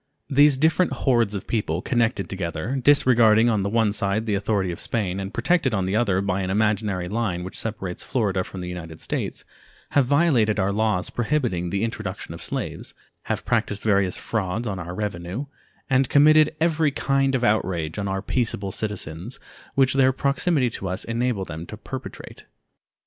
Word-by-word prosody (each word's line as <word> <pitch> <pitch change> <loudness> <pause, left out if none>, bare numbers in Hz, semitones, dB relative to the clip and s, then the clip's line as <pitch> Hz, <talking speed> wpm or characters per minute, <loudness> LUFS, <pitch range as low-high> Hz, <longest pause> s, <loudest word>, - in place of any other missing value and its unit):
These 145 0 +5
different 160 +5 +2
hordes 120 -6 +1
of 95 - -5
people, 90 -7 -1
connected 115 -5 0
together, 90 +5 -3
disregarding 120 -5 +5
on 105 -3 +1
the 100 - -1
one 110 -1 +2
side 105 +1 0
the 110 - -1
authority 100 -2 0
of 85 - -7
Spain, 100 -5 -1
and 95 0 -5
protected 130 -1 +1
on 95 -2 0
the 95 +2 -1
other 100 -5 +2
by 100 -1 -1
an 95 - -2
imaginary 105 -2 0
line 100 -4 -2
which 95 - -8
separates 95 -5 -4
Florida 100 -7 0
from 95 - -8
the 90 - -5
United 80 -3 -7
States, - - -4 0.5
have 140 -3 +3
violated 130 -8 +3
our 95 +1 +1
laws 105 -3 0
prohibiting 120 - -1
the 100 +4 -1
introduction 100 -6 -4
of 85 - -9
slaves, 85 - -5 0.3
have - - -3
practiced 105 -1 0
various 100 -3 +2
frauds 110 +1 -2
on 95 -3 -3
our 90 0 -6
revenue, 100 +4 -4 0.4
and 135 -1 +2
committed 155 +2 +5
every 160 -2 +2
kind 135 -1 +1
of 125 - -1
outrage 95 -6 0
on 100 - -2
our 95 0 -2
peaceable 105 -6 -1
citizens 105 0 -5 0.4
which 135 -1 +4
their 130 -1 +4
proximity 140 0 +1
to 95 -3 -5
us 95 - -3
enabled 115 -4 -1
them 80 +1 -6
to 105 - -8
perpetrate. 130 +4 -9
105 Hz, 175 wpm, -24 LUFS, 95-125 Hz, 0.5 s, These